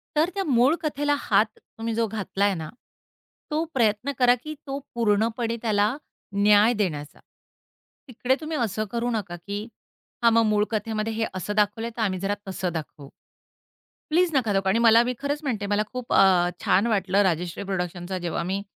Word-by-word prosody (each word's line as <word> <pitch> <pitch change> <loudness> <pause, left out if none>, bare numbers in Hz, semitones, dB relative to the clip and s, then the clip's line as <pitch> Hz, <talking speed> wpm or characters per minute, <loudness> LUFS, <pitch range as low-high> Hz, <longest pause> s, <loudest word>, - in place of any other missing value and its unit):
तर 310 +3 +3
त्या 395 - 0
मूळ 265 +2 +4
कथेला 290 -1 0
हात 220 - +3
तुम्ही 225 0 -6
जो 230 +1 +1
घातलाय 205 -1 -1
ना, 160 -2 -6 0.8
तो 310 +2 +1
प्रयत्न 230 +2 +1
करा 245 -1 +6
की 310 - -5
तो 275 +1 -3 0.2
पूर्णपणे 230 +1 +1
त्याला 215 +1 +1 0.5
न्याय 210 +3 +6
देण्याचा. 155 -9 -3 0.9
तिकडे 250 +1 0
तुम्ही 310 0 -3
असं 220 -3 -1
करू 235 +1 -1
नका, 200 -6 -3
की 200 +4 -5 0.6
हां, 230 - +6
मग 230 0 +5
मूळ 210 -1 +2
कथेमध्ये 220 0 -2
हे 225 0 -1
असं 185 +3 -3
दाखवलंय, 210 +2 +1
तर - - -2
आम्ही 190 -4 0
जरा 195 +2 -1
तसं 185 -1 -3
दाखवू. 150 -3 -7 1.0
प्लीज 350 +3 +3
नका 240 -6 +2
दाखवू 195 -1 +1
आणि 195 +4 +3
मला 230 0 +6
मी 250 +1 -1
खरंच 285 +1 -2
म्हणते, 225 -8 -2
मला 205 +1 +1
खूप 250 -1 -5
अ, 185 -2 +5 0.2
छान 200 +5 +3
वाटलं, 200 -3 +2
राजश्री 175 -2 -1
प्रोडक्शनचा 180 -1 -3
जेव्हा 175 -1 -3
मी 190 +3 -2
215 Hz, 170 wpm, -25 LUFS, 195-240 Hz, 1.0 s, करा